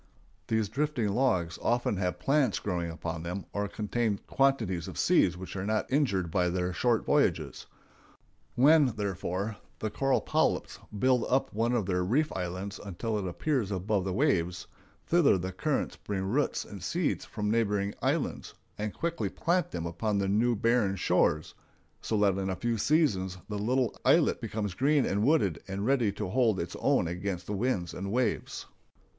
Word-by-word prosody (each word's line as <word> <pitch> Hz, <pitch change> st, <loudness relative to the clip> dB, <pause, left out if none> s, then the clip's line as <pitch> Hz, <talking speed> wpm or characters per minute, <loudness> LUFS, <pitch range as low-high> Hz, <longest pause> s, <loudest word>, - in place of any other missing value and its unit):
] -, -, -36 dB
These 110 Hz, -2 st, +1 dB
drifting 135 Hz, -1 st, -1 dB
logs 95 Hz, -8 st, +1 dB
often 120 Hz, -4 st, +1 dB
have 90 Hz, -1 st, -1 dB
plants 135 Hz, +7 st, +2 dB
growing 90 Hz, -4 st, -2 dB
upon 80 Hz, 0 st, -5 dB
them 90 Hz, +3 st, -5 dB
or 100 Hz, 0 st, -1 dB
contain 105 Hz, +1 st, -1 dB
quantities 115 Hz, -11 st, +1 dB
of -, -, -8 dB
seeds 90 Hz, 0 st, +3 dB
which 95 Hz, +2 st, -8 dB
are 95 Hz, -, -3 dB
not 110 Hz, +5 st, -1 dB
injured 100 Hz, -, +1 dB
by 90 Hz, 0 st, +2 dB
their 90 Hz, 0 st, -1 dB
short 115 Hz, +5 st, +1 dB
voyages. -, -, +1 dB, 0.9 s
When, 145 Hz, +3 st, +6 dB
therefore, 100 Hz, -1 st, -3 dB, 0.2 s
the 110 Hz, -, -3 dB
coral 135 Hz, +5 st, +1 dB
polyps -, -, 0 dB, 0.2 s
build 125 Hz, +1 st, +3 dB
up 135 Hz, +1 st, +1 dB
one 115 Hz, +3 st, +1 dB
of 115 Hz, -5 st, +1 dB
their 90 Hz, -1 st, 0 dB
reef 140 Hz, +12 st, +1 dB
islands 95 Hz, +2 st, -4 dB
until 105 Hz, +3 st, -3 dB
it 95 Hz, -, -3 dB
appears 120 Hz, -, -1 dB
above 100 Hz, +1 st, 0 dB
the 95 Hz, -, -2 dB
waves, 90 Hz, -, +1 dB, 0.4 s
thither 165 Hz, -, +4 dB
the 95 Hz, +1 st, -4 dB
currents 140 Hz, -, -2 dB
bring 100 Hz, -2 st, -3 dB
roots 125 Hz, +10 st, 0 dB
and 100 Hz, -3 st, -9 dB
seeds 165 Hz, -, -1 dB
from 105 Hz, -1 st, -3 dB
neighboring 105 Hz, -3 st, +1 dB
islands, -, -, -1 dB, 0.2 s
and 105 Hz, -1 st, -3 dB
quickly 170 Hz, 0 st, -2 dB
plant 180 Hz, +2 st, 0 dB
them 85 Hz, -1 st, -4 dB
upon 100 Hz, +5 st, -1 dB
the 100 Hz, -1 st, 0 dB
new 115 Hz, +5 st, +2 dB
barren 115 Hz, -2 st, +2 dB
shores, 75 Hz, -4 st, +1 dB, 0.5 s
so 110 Hz, -, -1 dB
that 100 Hz, -2 st, +2 dB
in 95 Hz, 0 st, -2 dB
a 95 Hz, -, -1 dB
few 115 Hz, +2 st, -1 dB
seasons 100 Hz, -, +1 dB
the 105 Hz, -1 st, -3 dB
little 125 Hz, +4 st, 0 dB
islet -, -, +4 dB
becomes 105 Hz, -3 st, -3 dB
green 140 Hz, +7 st, +2 dB
and 100 Hz, +2 st, 0 dB
wooded 115 Hz, -, +2 dB
and 95 Hz, +1 st, -3 dB
ready 125 Hz, -5 st, +2 dB
to 105 Hz, -1 st, -4 dB
hold 115 Hz, -2 st, +2 dB
its -, -, -4 dB
own 85 Hz, -, +2 dB
against 90 Hz, +1 st, -4 dB
the 105 Hz, -, -4 dB
winds 100 Hz, -5 st, -1 dB
and 95 Hz, +1 st, -4 dB
waves. 125 Hz, +2 st, -1 dB
105 Hz, 175 wpm, -29 LUFS, 95-125 Hz, 0.9 s, When